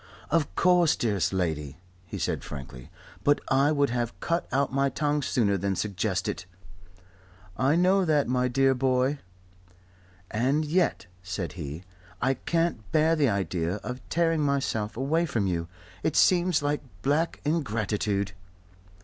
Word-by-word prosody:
"Of 155 -3 +1
course, 180 -3 +4
dearest 105 -5 0
lady," 80 -6 -2 0.3
he - - -6
said - - -2
frankly. 65 -4 -9 0.3
"But 145 0 +4
I 135 +2 +4
would 145 -4 +2
have 120 -1 -2
cut 170 +1 -1
out 135 0 +1
my 140 0 +2
tongue 150 +2 0
sooner 105 -8 +1
than 100 +1 -1
suggest 100 -2 -1
it." 90 - -4 1.1
"I 135 - +2
know 185 +3 +4
that, 150 -3 +2
my 125 0 +1
dear 135 +2 +3
boy." 130 +2 +1 1.1
"And 135 +8 +1
yet," 165 - +1 0.2
said 90 -3 -4
he, 80 -1 -6 0.4
"I 135 +1 +2
can't 165 - -1
bear 160 +1 +3
the 145 -5 +3
idea 95 -3 -1
of 125 +1 -5
tearing 165 -1 +2
myself 135 -7 -1
away 160 +6 +1
from 115 -8 0
you. 85 -3 -1 0.3
It 160 - -1
seems 175 -4 +4
like 145 0 0 0.2
black 155 +4 +1
ingratitude." 105 - -1
130 Hz, 140 wpm, -27 LUFS, 100-150 Hz, 1.1 s, course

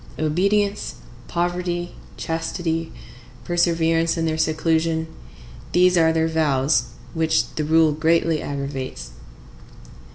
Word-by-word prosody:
Obedience, 200 +6 0 0.3
poverty, 175 0 -2 0.2
chastity, 165 0 -3 0.5
perseverance 165 -1 +1
in 165 - 0
their 160 -1 0
seclusion,—these 160 - 0
are 165 -2 +4
their 160 0 +1
vows, 140 -5 +2 0.3
which 160 0 +1
the 155 - -2
rule 160 +1 +4
greatly 160 +1 +1
aggravates. 135 - -5
160 Hz, 90 wpm, -22 LUFS, 155-170 Hz, 0.5 s, are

